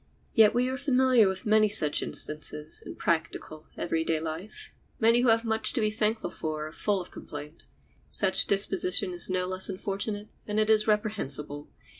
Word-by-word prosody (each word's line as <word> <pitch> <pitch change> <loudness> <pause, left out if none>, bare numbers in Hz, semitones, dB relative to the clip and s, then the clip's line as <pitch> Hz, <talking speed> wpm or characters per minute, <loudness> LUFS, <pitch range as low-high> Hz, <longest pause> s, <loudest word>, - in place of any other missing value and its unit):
Yet 220 -2 +5
we 250 +1 +2
are 260 +1 -3
familiar 260 -5 +3
with 190 0 -4
many 215 0 +4
such 155 -8 +4
instances 150 0 -3
in - - -9
practical, 160 -1 -3
every 165 -1 -1
day 160 -1 0
life. 165 +6 -7 0.3
Many 230 0 +4
who 250 - +2
have 225 0 +3
much 220 0 0
to 260 - -1
be 215 -1 +1
thankful 215 -2 -1
for 155 -1 -4
are 155 - -8
full 205 +4 -1
of 180 - -9
complaint. 150 +2 -10 0.4
Such - - +2
disposition 195 -1 +2
is 175 +1 -1
no 185 0 -1
less 185 +1 -2
unfortunate 200 +2 -4 0.2
than 210 0 -3
it 215 0 +3
is 215 0 +3
reprehensible. 150 -9 -1
200 Hz, 175 wpm, -27 LUFS, 160-220 Hz, 0.4 s, Yet